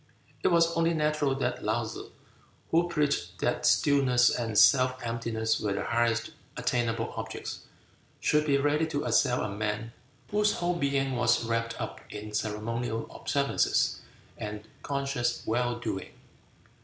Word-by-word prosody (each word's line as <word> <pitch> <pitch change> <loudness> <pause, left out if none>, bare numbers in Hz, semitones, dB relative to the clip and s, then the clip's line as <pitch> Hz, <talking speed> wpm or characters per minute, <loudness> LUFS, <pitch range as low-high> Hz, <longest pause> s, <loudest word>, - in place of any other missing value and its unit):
It - - +4
was 170 -1 +3
only 165 0 +2
natural 150 -3 +1
that 135 - -2
Laou 110 +2 0
tsze, 110 - -7 0.6
who 170 +1 +3
preached 150 -4 0
that - - 0
stillness 130 -4 +4
and 115 -3 -2
self 130 +2 +6
emptiness 115 -1 -1
were 105 -2 -1
the - - -2
highest 120 +3 0 0.3
attainable 115 -3 -1
objects, - - -6 0.5
should 150 0 +2
be 140 -1 +4
ready 145 +3 +1
to 145 -2 -2
assail 125 -2 +2
a - - -1
man 105 +3 -3 0.4
whose 210 0 +3
whole 175 0 0
being 140 -3 0
was 120 0 +2
wrapt 115 0 -2
up - - -5
in 105 0 -7
ceremonial 115 +2 -2
observances 140 -1 +1 0.4
and 105 0 -6
conscious 135 -4 -1
well 120 +2 0
doing. 95 -5 -4
120 Hz, 140 wpm, -29 LUFS, 115-145 Hz, 0.6 s, self